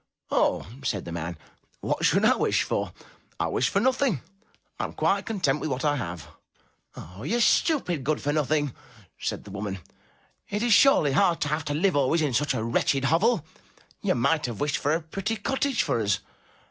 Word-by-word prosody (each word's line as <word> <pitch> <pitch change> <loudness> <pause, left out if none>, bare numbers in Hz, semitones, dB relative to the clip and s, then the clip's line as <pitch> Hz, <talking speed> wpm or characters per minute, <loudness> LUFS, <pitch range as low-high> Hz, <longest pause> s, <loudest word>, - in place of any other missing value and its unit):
''Oh!" - - +2 0.2
said 105 -8 -2
the 85 - -6
man, 85 0 -4 0.4
"What - - -2
should - - +3
I - - +5
wish - - +1
for? - - -2 0.5
I 85 - +1
wished 120 - +1
for 195 - +1
nothing. 255 - +1 0.6
I - - 0
am - - -7
quite 200 0 0
content 180 -11 0
with 155 - -3
what 130 +2 -2
I 145 -1 +3
have." 90 - -5 0.7
"Ah! 90 +5 -10
you 225 - -1
stupid 230 - +2
good 150 +3 0
for 145 - -1
nothing," 150 -2 0 0.5
said - - -3
the 100 - -11
woman, 100 -1 -4 0.7
"it 205 +2 -2
is 240 -2 +4
surely 185 - +5
hard 170 +3 +3
to 145 - 0
have 150 0 -1
to 145 - -2
live 185 +3 +2
always 145 +4 +2
in 145 -4 0
such 140 +1 +1
a 110 - -2
wretched 130 +4 +1
hovel; 170 - +2 0.6
you - - +1
might 150 +4 +1
have 115 -4 -6
wished 145 -1 0
for 145 - 0
a 165 - -2
pretty 195 +7 -3
cottage 265 +4 0
for 115 - 0
us. 100 -2 +1
150 Hz, 195 wpm, -26 LUFS, 125-195 Hz, 0.7 s, I